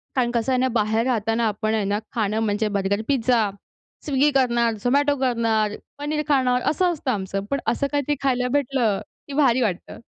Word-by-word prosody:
कारण 245 -2 +1
कसं 235 +2 0
आहे 255 - +2
ना, 260 - +2
बाहेर 220 +2 +1
राहताना 225 -2 +1
आपण 215 +1 -1
आहे 215 -2 0
ना, 205 - +1 0.2
खाणं 215 -1 0
म्हणजे 210 +1 0
बर्गर, 200 +2 0
पिझ्झा, 240 -5 +2 0.6
Swiggy 290 0 +2
करणार, 235 -3 +2
Zomato 285 +3 +3
करणार, 225 -4 +1 0.2
पनीर 300 +1 -1
खाणार 255 -4 +2
असं 360 +3 +1
असतं 285 -5 -2
आमचं. 195 -2 -3
पण 280 - +1
असं 280 +3 -1
काहीतरी 290 0 0
खायला 250 -2 +1
भेटलं, 245 -7 0 0.3
की 280 - -7
भारी 260 -4 +4
वाटतं. 195 -6 -3
240 Hz, 180 wpm, -23 LUFS, 215-270 Hz, 0.6 s, भारी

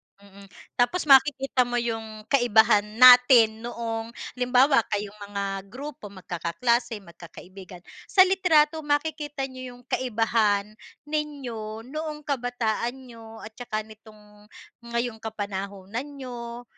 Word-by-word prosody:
Mm. 200 0 -17 0.3
Tapos 245 +9 +2
makikita 270 -3 +4
mo 245 - -3
yung 225 -2 -4
kaibahan 220 -5 +4
natin 245 -3 +7
noong 230 0 -5 0.2
halimbawa 250 +2 +3
kayong 205 0 -4
mga 200 0 -4 0.2
grupo, 260 -1 -9
magkakaklase, 205 +5 -2
magkakaibigan. 180 +1 -13 0.2
Sa 375 -3 +6
litrato, 325 -5 +3
makikita 295 -1 -2
niyo 255 -2 -7
yung 245 - -18
kaibahan 220 -4 0 0.3
ninyo 260 -8 -5
noong 300 +3 -6
kabataan 245 -3 -2
ninyo 230 -4 -13
at 220 +2 -12
tsaka 215 -3 -4
nitong 210 -1 -18 0.4
ngayong 235 -1 -3
kapanahunan 200 +2 -5
niyo. 240 -3 -8
235 Hz, 105 wpm, -25 LUFS, 215-260 Hz, 0.4 s, natin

